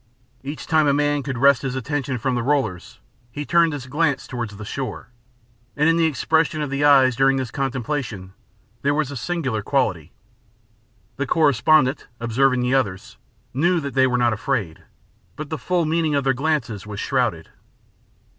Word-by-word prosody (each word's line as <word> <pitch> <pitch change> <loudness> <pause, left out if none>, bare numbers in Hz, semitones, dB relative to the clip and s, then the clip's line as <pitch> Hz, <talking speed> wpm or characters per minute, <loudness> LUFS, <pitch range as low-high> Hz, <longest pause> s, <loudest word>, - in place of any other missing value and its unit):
Each 145 +3 -7
time 155 -2 +3
a 140 - +3
man 145 0 +1
could 135 -2 -4
wrest 140 0 +4
his 135 -1 -3
attention 135 0 -2
from 130 +2 -1
the 120 - 0
rollers, 130 -9 -1 0.3
he 145 +4 -5
turned 170 0 +3
his 145 -4 -6
glance 145 +1 0
toward 120 -3 -4
the 105 +1 -9
shore, 130 +3 -5 0.7
and 150 +2 +2
in 165 - +4
the 165 -1 +3
expression 160 +1 +1
of 145 - -5
the 140 +1 -1
eyes 135 -4 +5
during 135 +1 +3
this 130 -3 -3
contemplation 130 -7 -3 0.5
there 145 +1 +1
was 150 -3 -1
a - - -6
singular 130 -4 -2
quality. 100 - -1 1.1
The 140 0 -2
correspondent, 145 -1 +3
observing 125 +2 +1
the 125 +1 0
others, 100 -8 -1 0.4
knew 170 +7 +2
that 140 -3 -5
they 130 0 +4
were 125 -1 0
not 120 -1 +2
afraid, 105 -6 -3 0.5
but 155 0 -7
the 155 - -3
full 180 -2 0
meaning 160 -1 0
of 140 - +1
their 135 0 +2
glances 130 -7 -2
was 105 -1 -6
shrouded. - - -1
135 Hz, 175 wpm, -22 LUFS, 125-150 Hz, 1.1 s, eyes